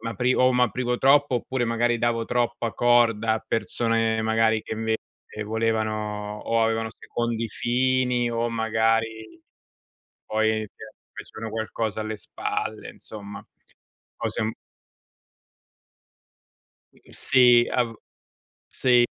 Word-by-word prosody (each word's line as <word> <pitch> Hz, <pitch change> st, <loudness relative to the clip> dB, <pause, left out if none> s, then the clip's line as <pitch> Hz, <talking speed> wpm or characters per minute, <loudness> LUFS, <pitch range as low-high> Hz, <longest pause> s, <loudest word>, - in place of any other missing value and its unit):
m'apri 120 Hz, +3 st, 0 dB
o 130 Hz, 0 st, +4 dB
m'aprivo 125 Hz, 0 st, +1 dB
troppo 140 Hz, -1 st, +4 dB
oppure 125 Hz, 0 st, -2 dB
magari 120 Hz, 0 st, +1 dB
davo 115 Hz, -1 st, 0 dB
troppa 120 Hz, -1 st, -1 dB
corda 115 Hz, -1 st, +3 dB
a 110 Hz, -, -5 dB
persone, 115 Hz, 0 st, 0 dB
magari, 110 Hz, 0 st, +2 dB
che, -, -, -5 dB
invece, 110 Hz, 0 st, -1 dB, 0.5 s
volevano 110 Hz, -1 st, -2 dB
o 115 Hz, 0 st, +2 dB
avevano 115 Hz, 0 st, 0 dB
secondi 115 Hz, -1 st, -3 dB
fini 125 Hz, +1 st, +1 dB
o, 115 Hz, 0 st, -1 dB
magari, 110 Hz, 0 st, -1 dB, 0.9 s
poi, 110 Hz, 0 st, 0 dB
ti -, -, -15 dB, 0.3 s
facevano 110 Hz, 0 st, -8 dB
qualcosa 110 Hz, -1 st, -3 dB
alle 110 Hz, 0 st, -4 dB
spalle, 110 Hz, +2 st, -4 dB
insomma. 100 Hz, -1 st, -10 dB, 0.7 s
Cose -, -, -3 dB
un 110 Hz, +1 st, 0 dB, 2.4 s
Mhmm, -, -, -22 dB
sì, 125 Hz, -2 st, +5 dB
a 125 Hz, -, +2 dB
v 115 Hz, -1 st, -7 dB, 0.7 s
sì, 125 Hz, -2 st, +3 dB
115 Hz, 110 wpm, -25 LUFS, 110-120 Hz, 2.4 s, sì